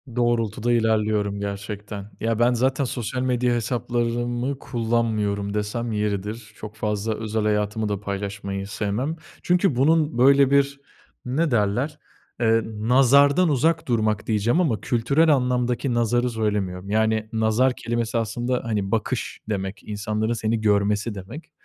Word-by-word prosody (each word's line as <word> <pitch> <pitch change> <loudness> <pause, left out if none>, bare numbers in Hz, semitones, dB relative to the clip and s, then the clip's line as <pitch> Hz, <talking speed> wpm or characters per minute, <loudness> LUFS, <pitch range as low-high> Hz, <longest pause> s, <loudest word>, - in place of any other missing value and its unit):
Doğrultuda 120 -1 0
ilerliyorum 105 -3 +1
gerçekten. 100 +1 -6
Ya 115 0 -1
ben, 120 +1 +4
zaten 130 +3 +1
sosyal 125 +1 -3
medya 125 -1 +1
hesaplarımı 120 +2 -1
kullanmıyorum 110 -4 -1
desem 110 +3 -2
yeridir. 105 +1 -3
Çok 110 0 -9
fazla 105 0 -2
özel 110 0 -2
hayatımı 105 0 0
da 100 -2 -2
paylaşmayı 100 -1 -4
sevmem. 110 +10 -2 0.3
Çünkü 180 -5 +2
bunun 150 0 +2
böyle 140 +1 +5
bir, 140 0 +2 0.5
ne 145 +4 0
derler? 120 +8 0 0.4
Eee, 115 -1 +3
nazardan 135 +9 +4
uzak 160 +3 +1
durmak 110 -3 0
diyeceğim 115 - +2
ama 125 -11 0
kültürel 140 +7 +2
anlamdaki 125 0 0
nazarı 120 +1 +1
söylemiyorum. 100 -4 -2
Yani, 110 0 +1
nazar 110 +4 +2
kelimesi 115 0 -2
aslında, 120 +3 -1
hani, 105 -4 -2
bakış 110 -2 -2
demek, 95 -1 -3
insanların 110 +2 -2
seni 110 0 -1
görmesi 105 +1 +1
demek. 115 - -9
115 Hz, 130 wpm, -23 LUFS, 105-125 Hz, 0.5 s, böyle